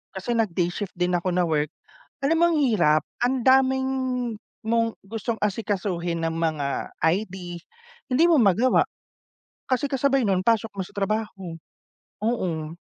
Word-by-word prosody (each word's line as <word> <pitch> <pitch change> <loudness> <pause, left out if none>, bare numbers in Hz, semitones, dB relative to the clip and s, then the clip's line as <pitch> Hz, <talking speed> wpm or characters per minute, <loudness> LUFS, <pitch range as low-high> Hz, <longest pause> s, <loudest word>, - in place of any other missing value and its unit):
kasi 190 +5 -3
nag-day 180 -6 +1
shift 195 0 -5
din 180 0 0
ako 175 +1 -1
na 180 - +3
work, 155 -2 +1 0.6
alam 325 +4 +3
mo 340 - +6
ang 310 - +2
hirap. 155 - +3 0.2
Ang 250 -1 +1
daming 265 0 +4 0.7
mong 230 0 +1
gustong 225 +2 -4
asikasuhin 185 -5 -1
na 165 - 0
mga 155 -4 -2
ID, 180 0 -1 0.5
hindi 285 +6 +4
mo 310 - +5
magawa, 225 +4 +4 0.8
kasi 260 +2 +1
kasabay 270 -3 +1
nun, 185 -1 +1
pasok 225 -1 +2
mo 190 - -2
sa - - -15
trabaho, 195 -4 -2 0.7
oh. 170 -8 -2
200 Hz, 140 wpm, -25 LUFS, 175-235 Hz, 0.8 s, mo